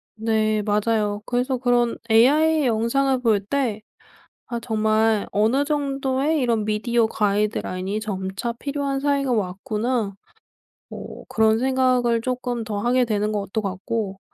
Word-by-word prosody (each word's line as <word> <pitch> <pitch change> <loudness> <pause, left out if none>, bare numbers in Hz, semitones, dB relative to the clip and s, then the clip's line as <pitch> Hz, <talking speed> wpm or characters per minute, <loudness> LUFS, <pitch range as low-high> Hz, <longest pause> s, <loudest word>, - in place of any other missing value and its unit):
네. 215 -1 +1
맞아요. 210 0 0
그래서 250 +2 0
그런 245 -1 +1
AI 295 +7 +4
영상을 250 +3 +1
볼 225 -4 +3
때 230 -3 -1 0.7
'아. 235 -1 -3
정말 220 -1 +1
어느 225 +7 +2
정도의 280 0 0
이런 230 -5 +1
미디어 225 +2 +1
가이드라인이 205 -2 -1
점차 195 +1 -4
필요한 280 +2 -3
사회가 280 -2 0
왔구나.' 210 +2 -1 0.8
어 - - -9
그런 220 0 +3
생각을 255 -2 +2
쪼끔 245 -1 -3
더 215 -2 -4
하게 245 +3 +2
되는 210 -1 -1
것도 205 +1 -2
같고 195 +1 -3
230 Hz, 265 characters per minute, -23 LUFS, 210-255 Hz, 0.8 s, AI